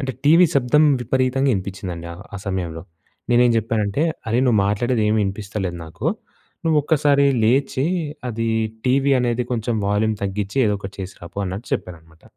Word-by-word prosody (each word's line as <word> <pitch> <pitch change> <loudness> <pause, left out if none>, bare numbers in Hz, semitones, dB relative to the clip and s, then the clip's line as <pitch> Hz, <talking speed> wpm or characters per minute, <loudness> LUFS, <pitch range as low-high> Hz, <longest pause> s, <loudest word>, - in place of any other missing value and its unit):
అంటే 130 -2 -3
టీవీ 165 +4 +7
శబ్దం 140 +3 +3 0.2
విపరీతంగా 130 +2 +1
ఇనిపిచిందండి 95 -3 -5 0.3
ఆ - - -3
సమయంలో. 85 -4 -3 0.5
నేనేం 120 0 +5
జెప్పానంటే, 110 +2 0 0.3
అరేయ్! 120 +4 +2
నువ్వు 115 -4 +3
మాట్లాడేదేం 110 +1 +1
ఇనిపిస్తలేదు 95 -2 -4
నాకు. 80 - -6 0.6
నువ్వొక్కసారి 150 -2 +3 0.2
లేచి, 135 +3 +2 0.4
అది 115 -1 -2 0.4
టీవీ 135 +2 +3
అనేది 120 0 0
కొంచెం 115 0 -1
వాల్యూమ్ 105 +2 +1
తగ్గించి, 100 +3 -3
ఏదో 105 - +1
ఒకటి 95 0 -8
చేసి 95 +1 -6
రాపో, 85 - -9
అన్నట్టు 95 +5 -5
చెప్పాననమాట. 80 -2 -9
110 Hz, 135 wpm, -21 LUFS, 95-130 Hz, 0.6 s, టీవీ